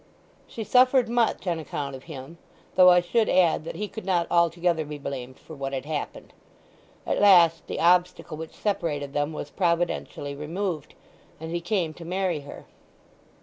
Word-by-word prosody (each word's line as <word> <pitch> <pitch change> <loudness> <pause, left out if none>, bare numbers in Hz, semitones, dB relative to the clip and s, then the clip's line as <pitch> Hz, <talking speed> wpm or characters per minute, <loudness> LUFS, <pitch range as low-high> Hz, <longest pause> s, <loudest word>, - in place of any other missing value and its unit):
"She 225 - -6
suffered 255 +2 +4
much 235 -3 0
on 170 -3 -1
account 140 -3 -5
of 130 - -12
him; 155 +1 -10 0.3
though 180 0 +7
I 180 0 +6
should 215 +6 +1
add 175 -4 +3
that - - -6
he 210 - -3
could 220 - -8
not 180 -2 +1
altogether 170 -1 +2
be 150 0 -7
blamed 130 -2 -6
for - - -13
what 135 -1 -5
had 135 0 -3
happened. 150 -1 -5 0.7
At - - 0
last 175 -5 +6
the - - -4
obstacle 180 -2 +2
which 160 +1 -8
separated 150 -9 -2
them 145 +1 0
was 145 -2 -7
providentially 170 -5 -1
removed; 160 +2 -4 0.4
and 160 +1 -7
he 170 0 -2
came 175 -3 -1
to 170 - -11
marry 180 -1 -1
her." 145 0 -11
170 Hz, 170 wpm, -25 LUFS, 150-185 Hz, 0.7 s, though